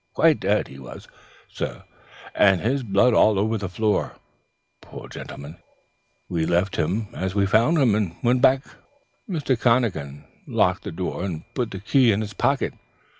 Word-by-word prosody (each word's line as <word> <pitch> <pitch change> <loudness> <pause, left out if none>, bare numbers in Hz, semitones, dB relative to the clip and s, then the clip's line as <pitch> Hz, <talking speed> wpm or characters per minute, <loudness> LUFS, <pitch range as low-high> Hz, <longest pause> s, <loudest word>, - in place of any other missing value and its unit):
Quite - - +4
dead, - - +1
he 65 - -12
was, 65 - -11 0.4
sir, - - -6 0.5
and 95 -3 +4
his 130 +8 0
blood 115 +2 +3
all 110 -2 +4
on 110 +3 0
the 100 -2 -4
floor, 105 +2 -1 0.7
poor - - -11
gentleman. 75 +4 -9 0.7
We 80 -3 -1
left 90 +3 +1
him 100 +7 -1
as 95 +1 -4
we 100 -1 +3
found 115 +11 +3
him, 130 -8 +3
and 100 -5 -1
went 125 +1 +2
back. 130 +1 +4 0.7
"Mr. 150 -7 0
McConachan 110 - 0 0.2
locked - - +1
the - - -4
door 90 +1 -4
and 85 -5 -4
put 125 -4 -2
the 95 - -7
key 120 +4 +3
in 105 +1 0
his 105 -1 -5
pocket. - - 0
105 Hz, 165 wpm, -23 LUFS, 90-120 Hz, 0.7 s, Quite